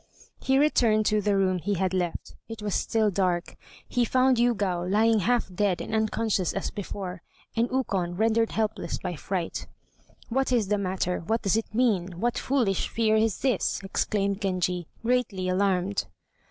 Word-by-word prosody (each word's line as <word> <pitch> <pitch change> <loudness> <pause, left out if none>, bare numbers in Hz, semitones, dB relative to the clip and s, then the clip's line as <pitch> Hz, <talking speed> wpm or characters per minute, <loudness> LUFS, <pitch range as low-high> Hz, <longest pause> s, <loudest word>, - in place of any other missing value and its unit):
He 265 0 +2
returned 235 -7 +3
to 210 0 +2
the 205 0 +1
room 185 -1 +2
he 200 +4 -1
had 190 +1 0
left; 180 -2 -2 0.2
it 225 -2 -7
was 205 -2 -2
still 220 -2 +1
dark. 180 -2 0 0.3
He 245 - +1
found 255 +2 +3
Yûgao 200 -7 +1
lying 220 +2 +4
half 230 -1 0
dead 190 -1 +1
and - - -6
unconscious 220 -4 0
as 195 - -3
before, 190 -3 -6 0.3
and 235 +1 +1
Ukon 195 -9 -1
rendered 225 +1 +2
helpless 215 -2 -1
by 175 - -4
fright. 175 +2 -4 0.6
"What 265 +2 0
is 225 -6 +2
the 210 -1 +2
matter? 185 -2 -1
What 220 +7 -1
does 195 -2 +2
it 225 -1 -3
mean? 190 -8 +1
What 240 +3 0
foolish 240 -9 +1
fear 220 -1 +2
is 220 -1 +1
this?" 265 -3 +1
exclaimed 200 +1 -1
Genji, 180 -3 -1 0.2
greatly 225 -7 0
alarmed. 185 - +1
205 Hz, 165 wpm, -27 LUFS, 185-225 Hz, 0.6 s, lying